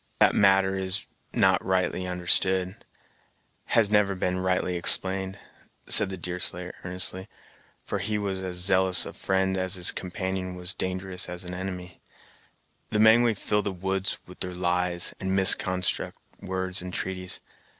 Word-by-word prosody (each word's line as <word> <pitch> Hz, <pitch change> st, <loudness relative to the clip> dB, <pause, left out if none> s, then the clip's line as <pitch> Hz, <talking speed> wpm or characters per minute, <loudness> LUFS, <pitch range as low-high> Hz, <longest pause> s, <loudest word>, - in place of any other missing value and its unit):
"That -, -, +4 dB
matter 95 Hz, -1 st, +3 dB
is 95 Hz, +2 st, -1 dB, 0.3 s
not -, -, +2 dB
rightly 95 Hz, 0 st, -1 dB
understood 90 Hz, +1 st, +1 dB, 0.9 s
has 105 Hz, -3 st, +3 dB
never 105 Hz, -2 st, +2 dB
been 90 Hz, 0 st, -2 dB
rightly 90 Hz, -1 st, -1 dB
explained," 95 Hz, +2 st, +3 dB, 0.5 s
said 95 Hz, -2 st, +4 dB
Deerslayer 90 Hz, 0 st, -1 dB
earnestly, 90 Hz, +1 st, +3 dB, 0.6 s
for -, -, -4 dB
he 105 Hz, -1 st, -2 dB
was 100 Hz, -2 st, -3 dB
as 90 Hz, -1 st, -5 dB
zealous 95 Hz, 0 st, +3 dB
a -, -, -8 dB
friend 95 Hz, 0 st, -1 dB
as 95 Hz, +1 st, 0 dB
his 90 Hz, -1 st, +6 dB
companion 95 Hz, 0 st, -5 dB
was 90 Hz, +1 st, -4 dB
dangerous 95 Hz, 0 st, -4 dB
as 90 Hz, +1 st, -6 dB
an 90 Hz, 0 st, -8 dB
enemy; 90 Hz, -1 st, -7 dB, 0.9 s
"the 105 Hz, -, -2 dB
Mengwe 110 Hz, +1 st, +4 dB
fill 105 Hz, +1 st, -1 dB
the 100 Hz, -, -4 dB
woods 95 Hz, +1 st, -3 dB
with 90 Hz, -, -15 dB
their 90 Hz, -1 st, -6 dB
lies, 90 Hz, 0 st, -1 dB
and 95 Hz, 0 st, -2 dB
misconstruct 95 Hz, -1 st, +2 dB, 0.2 s
words 95 Hz, -1 st, -3 dB
and 90 Hz, 0 st, -7 dB
treaties. 90 Hz, -1 st, -4 dB
95 Hz, 140 wpm, -25 LUFS, 90-95 Hz, 0.9 s, his